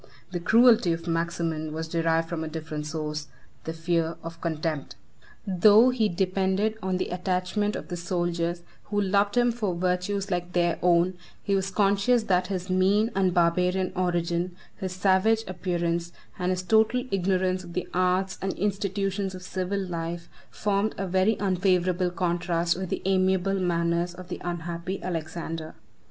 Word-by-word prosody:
The 175 - -2
cruelty 225 -1 +5
of 165 +1 -6
Maximin 165 -2 -1
was 160 +1 -4
derived 165 0 +1
from 165 -2 -3
a - - -4
different 155 -1 -5
source, 150 -1 -4 0.4
the 160 - -2
fear 165 0 0
of 165 0 -8
contempt. 155 -3 -3 0.5
Though 210 +6 +6
he 225 -4 +1
depended 190 +4 0
on 190 -1 -1
the - - -2
attachment 185 +3 -1
of - - -6
the 175 - -3
soldiers, 175 -1 -2 0.2
who 205 -1 -1
loved 200 +2 +2
him 240 0 +4
for 210 -6 -2
virtues 185 +3 -1
like 175 0 -2
their 175 -2 +1
own, 175 +1 +3 0.2
he 200 - 0
was 195 0 +1
conscious 205 +4 +2
that 185 -3 +1
his 185 -2 -3
mean 195 +4 +3
and 190 -1 +2
barbarian 180 +2 +2
origin, 175 0 0 0.2
his 185 -1 -4
savage 190 +4 +3
appearance, 175 -2 -2 0.3
and 180 0 0
his 185 0 -1
total 220 +5 +3
ignorance 185 -1 +1
of 175 -1 -10
the 180 - -2
arts 185 +1 +1
and 190 - -1
institutions 195 0 -1
of 185 - -9
civil 185 +2 -2
life, 170 -2 -4 0.2
8 - - -23
formed 205 +1 0
a 195 - -2
very 190 +4 +2
unfavorable 185 -2 +1
contrast 175 -1 0
with 185 0 -4
the - - -3
amiable 190 0 +2
manners 170 0 0
of 180 0 -10
the - - -5
unhappy 175 +2 -4
Alexander. 165 -1 -4
180 Hz, 160 wpm, -26 LUFS, 170-195 Hz, 0.5 s, Though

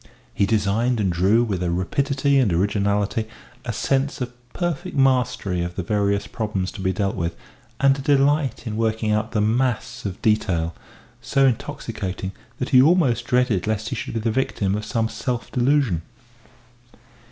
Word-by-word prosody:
He 100 - +1
designed 110 +3 +1
and 95 -3 +1
drew 100 +7 +3
with 100 -6 -2
a 90 - 0
rapidity 135 +10 +1
and 120 -7 +3
originality, 100 +4 0 0.4
a 120 - -3
sense 135 +5 0
of 125 -1 -4 0.2
perfect 175 -6 -3
mastery 125 -9 +2
of 85 0 -4
the 95 - -3
various 100 +1 0
problems 100 -4 -3
to 95 - -8
be 95 0 +1
dealt 100 0 -1
with, 85 0 -2 0.4
and 135 0 +5
a 135 - -6
delight 140 -2 +2
in 110 - -3
the 110 - -3
working 110 -1 0
out 110 +2 -1
of 105 - +3
mass 120 +1 0
and 95 -2 -4
detail, 90 -7 +1 0.5
so 135 +3 +2
intoxicating 110 -7 -2 0.3
that 125 - -3
he 130 -2 +7
almost 135 -7 +3
dreaded 125 -7 +1
lest 110 +1 -1
he - - -3
should - - -5
be - - +1
the 110 +1 0
victim 110 -5 0
of 105 +1 -2
some 110 +1 0
self 115 +2 -4
delusion. 125 - +2
110 Hz, 170 wpm, -23 LUFS, 100-130 Hz, 0.5 s, he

